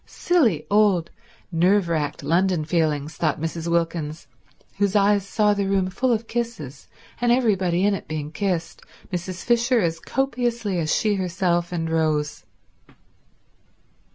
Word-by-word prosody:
Silly 245 - +1
old 200 -5 +3 0.4
nerve 180 +3 +3
racked 150 -3 -2
London 170 +1 +1
feelings, 155 -2 -1
thought 155 -4 0
Mrs. 165 +1 -4
Wilkins, 165 -2 -1 0.5
whose 200 0 +1
eyes 200 -1 +3
saw 210 0 +2
the 200 -1 -1
room 190 -1 +1
full 255 +6 0
of 230 -1 0
kisses, 225 - -5 0.3
and 240 -1 +3
everybody 195 -7 +2
in 205 - +3
it 195 - -5
being 150 -1 -4
kissed, 175 -1 -2 0.3
Mrs. 180 +1 -4
Fisher 240 +1 +3
as 165 -4 0
copiously 240 -7 -1
as 155 -1 -1
she 215 -1 +2
herself 180 -2 0
and 165 -2 -2
Rose. 155 -2 -1
180 Hz, 135 wpm, -23 LUFS, 165-210 Hz, 0.5 s, old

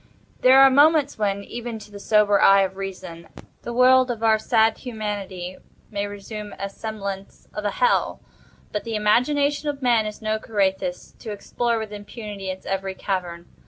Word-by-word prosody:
There 260 +1 +6
are 270 0 +8
moments 290 -1 +4
when, 200 -1 -1
even 235 +1 -6
to 215 -1 -13
the 200 - -9
sober 205 -1 +3
eye 195 0 +7
of 190 0 -3
Reason, 185 -4 -7 0.3
the 240 - -6
world 255 +1 +5
of 230 -2 -4
our 220 -1 +4
sad 220 -1 +2
Humanity 205 -6 -5 0.3
may 205 -1 -2
assume 205 +1 -8
the 195 - -4
semblance 200 -2 -7
of 210 - -5
a - - +2
Hell—but 350 - -2
the 230 -1 -4
imagination 285 +8 +2
of 280 -2 -5
man 235 -3 +3
is 210 - -7
no 215 0 -1
Carathis, 190 -4 -2
to 225 - -8
explore 230 +3 -2
with 220 -1 -5
impunity 205 -1 -7
its 185 0 -6
every 195 0 -3
cavern. 175 -4 -4
210 Hz, 165 wpm, -23 LUFS, 195-235 Hz, 0.3 s, are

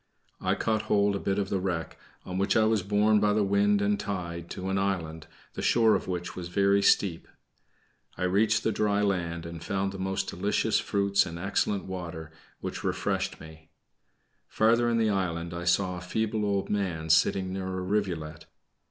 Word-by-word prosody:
I - - 0
caught 110 -1 0
hold 100 -1 +3
of 100 - -3
a - - -15
bit 95 0 +1
of 100 -1 -1
the 95 - 0
wreck, 90 -3 -3 0.3
on 90 +1 -4
which 100 +2 +2
I 110 - +5
was 110 -1 +2
borne 105 +2 +3
by 105 0 +2
the 105 0 +2
wind 100 +1 +2
and 100 0 +1
tide 85 -3 -4
to 95 0 -5
an 95 0 0
island, 80 -5 -2 0.3
the - - -5
shore 115 -2 +4
of - - -1
which 90 -1 -4
was 90 -2 -5
very 100 +2 +3
steep. 95 -3 +2 0.9
I - - -3
reached 105 +4 +2
the 110 - +1
dry 105 -1 +1
land, 85 -4 -1
and 85 -1 -7
found 95 0 -1
the 95 - -8
most 95 0 -2
delicious - - 0
fruits 100 -1 +1
and 85 0 -6
excellent 100 +2 -1
water, 85 -4 -6 0.3
which - - -5
refreshed 95 -1 -1
me. 80 0 -13 0.8
Farther 115 +2 +3
in 115 - +1
the 110 -2 +2
island 85 -3 -2
I 85 0 -5
saw 90 0 +1
a - - -7
feeble 110 +3 -1
old 100 -1 0
man 85 -6 -1
sitting 95 +3 +3
near 95 -1 -4
a 95 0 -3
rivulet. 90 -6 -2
95 Hz, 190 wpm, -28 LUFS, 90-105 Hz, 0.9 s, I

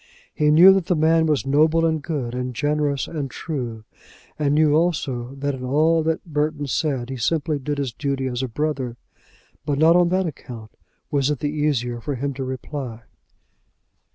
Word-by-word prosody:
He 150 0 +2
knew 175 +6 +8
that 190 -3 0
the 180 - +2
man 160 +1 +3
was 150 -3 +1
noble, 155 +4 +3
and 160 -2 0
good, 140 -7 -3
and 125 0 -4
generous, 145 -1 0
and 145 -5 -4
true; 120 -10 -5 0.6
and 145 -1 +1
knew 155 -1 +4
also 140 -6 0
that 140 +1 -2
in 130 -1 -7
all 155 +5 +2
that 160 0 -1
Burton 150 -2 -1
said 135 -3 -1
he 130 - -4
simply 155 +5 0
did 145 +2 -3
his 135 -4 -2
duty 140 0 -2
as 125 -1 -2
a 130 - -1
brother. 130 -2 -3 0.7
But 145 -2 -1
not 160 +3 +5
on 175 -1 +4
that 185 +1 +1
account 120 -8 -8 0.4
was 140 -2 +1
it 150 - 0
the 145 +3 -2
easier 130 -6 -1
for 145 +3 -3
him 140 +2 -3
to 135 0 -5
reply. 130 -2 -6
145 Hz, 180 wpm, -22 LUFS, 130-155 Hz, 0.7 s, knew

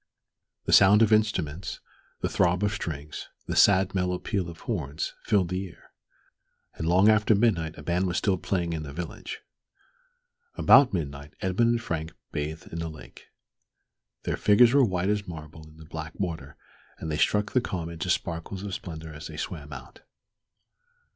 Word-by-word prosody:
The - - +1
sound 100 +3 +7
of 110 0 +4
instruments, 90 -6 0 0.4
the - - +1
throb 90 +1 +2
of 105 - +2
strings, 75 -7 -5 0.2
the - - -3
sad, 95 -2 +5
mellow 90 -1 0
peal 90 -1 -2
of 85 - -11
horns, 70 +3 -3
filled 100 -5 +2
the 95 +1 -2
air; 85 - -18 0.8
and 80 - -4
long 90 +4 +5
after 110 0 +5
midnight 95 -8 +1
a 75 - -9
band 90 +4 0
was 90 - -1
still 95 -4 +1
playing 85 -3 -1
in 80 - -3
the 70 -2 -7
village. 85 +2 -6 1.1
About 140 -2 +6
midnight 70 -4 -4
Edmund 95 +5 +2
and 120 0 +1
Frank 80 -3 -3 0.2
bathed 80 +4 -5
in 85 - -3
the 85 -1 -3
lake. 80 -1 -13 1.0
Their - - -2
figures 115 +4 +5
were 140 -1 +6
white 95 -4 0
as 105 -1 0
marble 80 -1 -9
in 80 - -18
the 80 - -12
black 80 +1 -7
water, 85 -4 -4 0.4
and 80 - -5
they 75 - -1
struck 105 0 +2
the 125 - +3
calm 85 -7 -4
into 85 +2 -5
sparkles 85 +3 -2
of 100 -2 -5
splendor 80 -3 -7
as 75 0 -8
they 80 - -9
swam 75 -3 -5
out.... 65 -3 -10
85 Hz, 175 wpm, -27 LUFS, 80-100 Hz, 1.1 s, sound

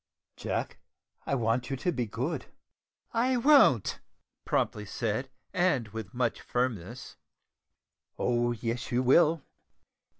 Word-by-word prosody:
"Jack, - - -3 0.5
I 140 - +1
want 120 0 0
you 135 - -1
to 175 +7 -1
be 125 -7 -2
good." 125 +10 -3 0.7
"I 250 +2 +2
won't!" 240 - +5 0.5
promptly 105 - 0
said, 115 +4 -2 0.2
and 175 - +1
with 110 -3 -7
much 120 -2 -1
firmness. 120 -1 -3 1.0
"Oh, 120 -1 +1
yes, 120 +2 -3
you 125 +1 +2
will!" 155 +4 +4
125 Hz, 110 wpm, -29 LUFS, 115-145 Hz, 1.0 s, won't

